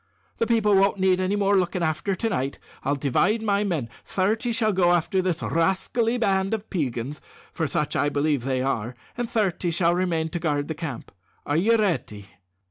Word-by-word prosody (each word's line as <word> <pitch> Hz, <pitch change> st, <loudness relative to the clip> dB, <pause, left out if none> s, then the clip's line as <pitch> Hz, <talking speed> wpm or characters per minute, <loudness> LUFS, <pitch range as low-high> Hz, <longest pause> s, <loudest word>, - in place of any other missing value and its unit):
The 230 Hz, -, +1 dB
people 220 Hz, -3 st, +3 dB
won't 195 Hz, +1 st, +3 dB
need 185 Hz, -1 st, +3 dB
any 185 Hz, +2 st, 0 dB
more 200 Hz, 0 st, +2 dB
looking 180 Hz, -1 st, -1 dB
after 160 Hz, +5 st, 0 dB
to 225 Hz, +4 st, -1 dB
night. 135 Hz, -8 st, -2 dB, 0.3 s
I'll 140 Hz, +2 st, +1 dB
divide 175 Hz, -, +1 dB
my 205 Hz, -1 st, +2 dB
men 165 Hz, -, -1 dB, 0.2 s
thirty 220 Hz, +5 st, 0 dB
shall 225 Hz, -2 st, +1 dB
go 175 Hz, -2 st, +4 dB
after 175 Hz, +2 st, +1 dB
this 180 Hz, -3 st, -1 dB
rascally 195 Hz, +8 st, +1 dB
band 195 Hz, -2 st, +1 dB
of 215 Hz, 0 st, -8 dB
Peigans, 140 Hz, -, -3 dB, 0.3 s
for 160 Hz, -, -1 dB
such 150 Hz, -2 st, -1 dB
I 145 Hz, +1 st, +2 dB
believe 145 Hz, -2 st, 0 dB
they 130 Hz, -1 st, 0 dB
are, 125 Hz, -2 st, -2 dB, 0.2 s
and 240 Hz, -1 st, -3 dB
thirty 195 Hz, -5 st, 0 dB
shall 170 Hz, 0 st, +2 dB
remain 170 Hz, -3 st, 0 dB
to 175 Hz, -, -3 dB
guard 150 Hz, -3 st, -1 dB
the -, -, -1 dB
camp. 155 Hz, -6 st, -6 dB, 0.3 s
Are 145 Hz, -, 0 dB
you 225 Hz, +7 st, +4 dB
ready?" 110 Hz, -, -2 dB
180 Hz, 190 wpm, -25 LUFS, 150-200 Hz, 0.3 s, go